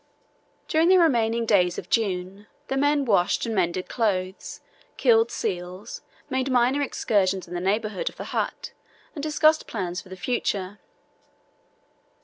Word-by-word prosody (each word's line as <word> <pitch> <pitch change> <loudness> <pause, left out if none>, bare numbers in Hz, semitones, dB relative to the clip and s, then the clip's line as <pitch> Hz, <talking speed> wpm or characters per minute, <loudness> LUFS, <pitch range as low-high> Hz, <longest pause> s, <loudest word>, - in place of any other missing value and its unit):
During 320 +2 +3
the 375 - +7
remaining 235 -8 +2
days 180 -5 +3
of - - -6
June 195 -2 -1 0.2
the 270 - -1
men 285 +1 +2
washed 195 -7 +2
and 230 - -3
mended 185 -2 0
clothes, 190 -5 -2 0.4
killed 230 -2 +4
seals, 185 +2 -5 0.3
made 260 -1 -1
minor 255 +2 +2
excursions 195 -9 0
in 175 - -9
the 175 - -2
neighbourhood 210 +1 -1
of - - -18
the - - -5
hut, - - -3 0.4
and 295 - -6
discussed 310 +1 +2
plans 185 -3 -4
for 185 - -17
the 185 - -9
future. 200 -3 -2
215 Hz, 140 wpm, -25 LUFS, 185-260 Hz, 0.4 s, the